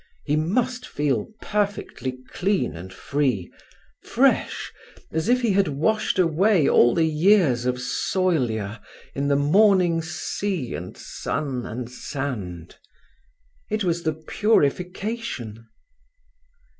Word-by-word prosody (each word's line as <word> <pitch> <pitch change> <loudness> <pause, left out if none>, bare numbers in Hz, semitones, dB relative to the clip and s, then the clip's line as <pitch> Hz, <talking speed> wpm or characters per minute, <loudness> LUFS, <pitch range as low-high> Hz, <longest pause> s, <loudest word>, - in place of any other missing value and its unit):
He 150 - +1
must 245 +11 0
feel 140 -7 -1 0.2
perfectly 200 -10 -2
clean 195 - 0
and 90 +3 -9
free—fresh, 130 -5 -1 0.4
as 160 +7 -1
if 250 +1 +4
he 230 - +3
had 195 -1 +3
washed 160 +12 0
away 180 0 +3
all 120 0 +5
the 165 - +3
years 155 - +3
of 125 0 0
soilure 125 - -1 0.3
in 140 +1 -1
this 140 0 +3
morning's 175 +1 +3
sea 175 -4 -3
and 90 +2 -7
sun 130 -5 -4
and 120 +1 -5
sand. 120 - -5 0.9
It 215 -1 -1
was 170 -2 0
the 160 -2 0
purification. 180 - -1
155 Hz, 105 wpm, -24 LUFS, 125-195 Hz, 0.9 s, all